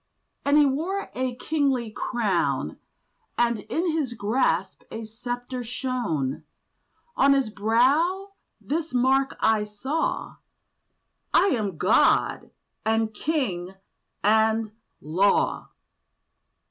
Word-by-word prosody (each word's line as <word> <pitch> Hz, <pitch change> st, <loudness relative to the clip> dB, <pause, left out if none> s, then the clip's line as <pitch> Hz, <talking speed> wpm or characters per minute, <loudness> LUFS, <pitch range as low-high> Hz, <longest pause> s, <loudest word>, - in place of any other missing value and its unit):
And 285 Hz, +1 st, +3 dB
he 300 Hz, -, +6 dB
wore 330 Hz, +9 st, -2 dB
a 255 Hz, -1 st, -2 dB
kingly 265 Hz, -4 st, 0 dB
crown; 180 Hz, -, -1 dB, 0.6 s
And 235 Hz, -2 st, +2 dB
in 330 Hz, -, -1 dB
his 300 Hz, -6 st, -1 dB
grasp 205 Hz, -4 st, 0 dB
a 225 Hz, -, -6 dB
sceptre 245 Hz, +3 st, -5 dB
shone; 225 Hz, -, -2 dB, 0.7 s
On 275 Hz, +1 st, +5 dB
his 270 Hz, -5 st, +1 dB
brow 280 Hz, -, +2 dB, 0.3 s
this 320 Hz, -1 st, -3 dB
mark 265 Hz, +2 st, +2 dB
I 220 Hz, -1 st, +3 dB
saw— 250 Hz, +10 st, -3 dB, 1.0 s
'I -, -, +6 dB
AM 205 Hz, -8 st, -2 dB
GOD, 185 Hz, +7 st, +3 dB, 0.3 s
AND 220 Hz, 0 st, +1 dB
KING, 195 Hz, -, -2 dB, 0.5 s
AND 220 Hz, +1 st, +3 dB, 0.3 s
LAW! 180 Hz, +7 st, +1 dB
240 Hz, 95 wpm, -25 LUFS, 210-275 Hz, 1.0 s, he